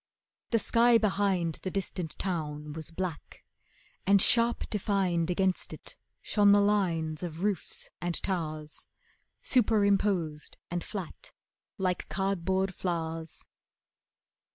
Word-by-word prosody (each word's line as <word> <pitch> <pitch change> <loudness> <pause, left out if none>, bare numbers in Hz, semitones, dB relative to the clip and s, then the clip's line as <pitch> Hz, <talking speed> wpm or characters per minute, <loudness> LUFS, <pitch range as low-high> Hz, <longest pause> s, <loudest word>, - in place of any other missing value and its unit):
The 230 - +3
sky 235 +2 +4
behind 195 -6 0
The 185 - -3
distant 180 -3 -4
town 150 -5 -3
was 160 -1 -6
black, 170 -2 -6 0.6
and 200 0 +6
sharp 235 +4 +5
defined 190 -5 0
Against 185 +1 0
it - - -11 0.3
shone 205 -1 +4
the 205 - +6
lines 175 -7 +1
of 170 0 -5
roofs 205 -4 -2
and 175 -1 -1
towers, 155 -5 -4 0.6
Superimposed 200 - +2
and 175 -1 -2
flat 190 -6 -7 0.4
like 185 -3 -2
cardboard 190 0 -1
flowers. 165 -3 -3
185 Hz, 105 wpm, -29 LUFS, 165-200 Hz, 0.6 s, and